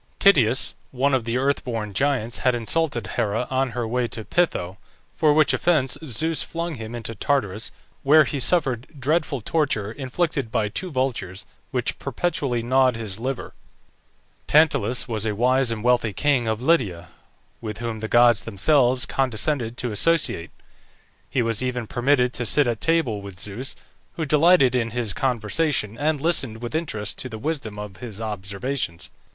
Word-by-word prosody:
TITYUS, 130 - +4 0.2
one 135 +2 0
of 130 -4 +1
the 115 +1 -1
earth 140 +2 0
born 115 -5 -4
giants, 130 -2 0
had 125 -1 +2
insulted 120 0 0
Hera 110 +3 0
on 130 -1 0
her 120 -2 -1
way 120 +1 0
to 110 -2 -6
Peitho, 95 - 0 0.4
for 155 -2 +3
which 155 +1 +4
offence 155 -6 +2
Zeus 155 +4 0
flung 170 0 -4
him 115 -3 -7
into 115 -1 -4
Tartarus, 110 -3 -1 0.3
where 155 +3 +6
he 145 0 -3
suffered 130 -5 +2
dreadful 145 -1 0
torture, 110 -6 0
inflicted 140 0 -2
by 105 -2 0
two 185 - -4
vultures, 125 - -3 0.2
which - - -2
perpetually 135 -9 -2
gnawed 130 0 +3
his 110 -3 -6
liver. 130 +2 -4 0.9
TANTALUS 135 -7 +3
was 110 -2 -2
a 105 - -1
wise 130 +3 +2
and 110 -2 -3
wealthy 120 -3 +2
king 135 -1 +1
of 110 +2 -2
Lydia, 100 - +1 0.5
with 105 -3 -5
whom 115 -2 -4
the 110 - -4
gods 120 -1 +5
themselves 125 +4 +2
condescended 120 -1 -1
to 120 - -1
associate; 150 - +2 0.8
he 125 - 0
was 115 -1 +1
even 125 -2 -2
permitted 125 +1 +1
to 120 - -2
sit 145 +5 +3
at 120 -3 -2
table 160 -11 +1
with 100 -2 -10
Zeus, 105 +7 -5 0.4
who 160 - -3
delighted 150 -2 +5
in 120 -2 0
his 115 -3 -1
conversation, 125 -1 0
and 150 +3 0
listened 135 -8 +1
with 120 +3 -6
interest 110 -11 -3
to 130 - -3
the 110 - -7
wisdom 135 -5 -4
of 105 -2 -7
his 110 -5 -7
observations. 105 -1 -3
125 Hz, 160 wpm, -23 LUFS, 110-140 Hz, 0.9 s, where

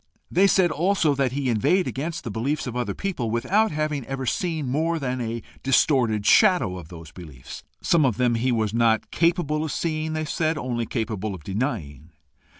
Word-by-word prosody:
They 190 +4 +4
said 185 -3 +3
also 165 -1 +2
that 135 -2 0
he 140 -1 -2
inveighed 180 - +2
against 160 +5 -4
the 115 - -5
beliefs 135 +8 -2
of 125 -2 -5
other 120 -5 -2
people, 170 - -3
without 185 - +2
having 150 -3 -2
ever 135 -1 -4
seen 160 +2 -1
more 160 +6 0
than 130 -4 -3
a 115 0 -4 0.2
distorted 125 -5 +2
shadow 180 - +4
of 85 -4 -9
those 80 -2 -11
beliefs 75 -7 -10 0.2
some 170 -3 +3
of 125 -6 +1
them 125 -1 +2
he 120 +3 +1
was 110 -3 0
not 115 -1 +2
capable 165 -3 +1
of 160 - -3
seeing, 155 -1 -2
they 155 0 -2
said 155 +1 -1
only 120 -4 -3
capable 110 -4 -3
of 85 - -12
denying. 85 - -4
130 Hz, 185 wpm, -24 LUFS, 110-155 Hz, 0.2 s, They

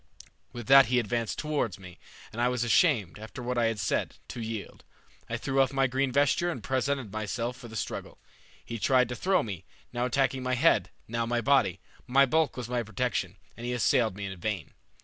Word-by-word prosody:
With 120 -2 -7
that 135 +1 +8
he 125 +2 +2
advanced 115 -1 -1
towards 145 - -1
me, 90 -2 -13 0.3
and 115 - -3
I 120 - +4
was 125 -1 0
ashamed, 115 - +2
after 110 +3 -8
what 125 +1 -2
I 115 - +3
had 115 -2 0
said, - - -1
to 120 - -6
yield. 110 -2 -6 0.5
I 115 - -1
threw 135 +3 +1
off 135 - +2
my 135 -1 +2
green 135 +1 0
vesture 145 +6 +2
and 170 - -5
presented 130 -3 -1
myself 115 +3 -3
for 125 -1 -11
the 110 - -10
struggle. - - -5 0.5
He 115 -1 -5
tried 125 0 +3
to 125 - -3
throw 185 +7 +2
me, 100 -7 -6 0.3
now 120 0 0
attacking 135 +1 +1
my 130 0 0
head, - - +3 0.2
now 115 0 -2
my 120 0 +1
body. 140 +2 +2 0.3
My 135 +2 +5
bulk 160 +2 +1
was 125 -2 -4
my 125 0 -1
protection, 115 0 -2 0.2
and 120 - -10
he 120 +1 -2
assailed 115 -3 +2
me 100 0 -5
in 95 -1 -5
vain. 100 -5 -3
120 Hz, 210 wpm, -28 LUFS, 110-135 Hz, 0.5 s, that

